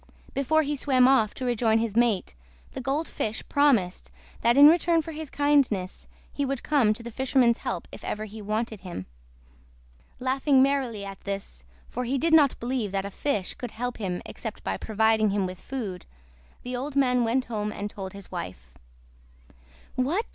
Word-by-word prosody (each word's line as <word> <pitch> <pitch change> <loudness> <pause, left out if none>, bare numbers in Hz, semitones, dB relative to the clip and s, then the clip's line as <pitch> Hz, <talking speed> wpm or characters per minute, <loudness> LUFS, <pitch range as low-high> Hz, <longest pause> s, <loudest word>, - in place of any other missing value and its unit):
Before 315 +4 +2
he 295 0 -1
swam 260 -2 +4
off 255 -6 +3
to 260 - -4
rejoin 230 -2 +2
his 225 -2 -1
mate, 230 - +2 0.4
the - - -6
Gold 275 +5 -1
Fish 220 +1 -4
promised 245 -11 +2 0.3
that 235 +2 +3
in 290 +1 +10
return 335 0 +4
for 325 - -7
his 310 -1 -6
kindness 275 -11 +1 0.3
he 285 - -1
would 275 -2 -2
come 275 -8 +3
to 220 +2 -4
the 235 - -7
fisherman's 255 -1 +2
help - - -4
if - - -11
ever 215 +1 -3
he 215 +1 -9
wanted 215 +1 -2
him. 175 - -7 1.1
Laughing 265 +1 +3
merrily 260 -7 0
at 195 -1 -8
this, 195 - -5 0.2
for 250 - -4
he 265 +3 0
did 320 +4 +1
not 295 -4 +5
believe 240 -4 -2
that 195 0 -1
a 200 - -5
fish 210 -5 -2
could 245 - -6
help 245 +2 -4
him 185 -5 -3
except - - -7
by 95 - -1
providing 220 - +2
him 200 -1 0
with 185 0 -7
food, 210 -9 -5 0.6
the 250 0 -4
old 270 +3 -4
man 250 -3 +3
went 245 +3 +1
home 210 -2 -3
and 205 0 -5
told 190 -2 -7
his 200 -1 -10
wife. - - -7 1.2
"What!" 315 - 0
240 Hz, 180 wpm, -26 LUFS, 205-275 Hz, 1.2 s, in